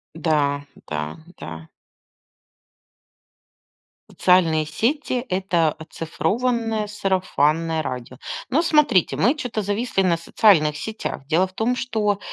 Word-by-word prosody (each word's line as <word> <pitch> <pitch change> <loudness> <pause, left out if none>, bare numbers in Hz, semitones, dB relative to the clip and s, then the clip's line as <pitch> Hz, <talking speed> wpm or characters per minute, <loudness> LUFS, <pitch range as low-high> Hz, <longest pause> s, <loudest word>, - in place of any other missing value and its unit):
Да. 145 -3 0 0.2
Да. 75 0 -4 0.2
Да. 80 0 -8 2.4
Социальные 165 -4 +3
сети- 250 - -1
это 180 -3 +1
оцифрованное 215 +8 -2
сарафанное 165 -5 0
радио. 125 -2 -6 0.3
Но 275 +5 +3
смотрите, 300 - +3
мы 255 +6 +3
чё-то 245 -7 -3
зависли 205 +1 0
на 180 -3 +3
социальных 165 -3 +3
сетях. 180 -6 -5
Дело 165 +5 +3
в 185 - -11
том, 225 +5 0
что 215 -5 -1
185 Hz, 100 wpm, -22 LUFS, 155-220 Hz, 2.4 s, Социальные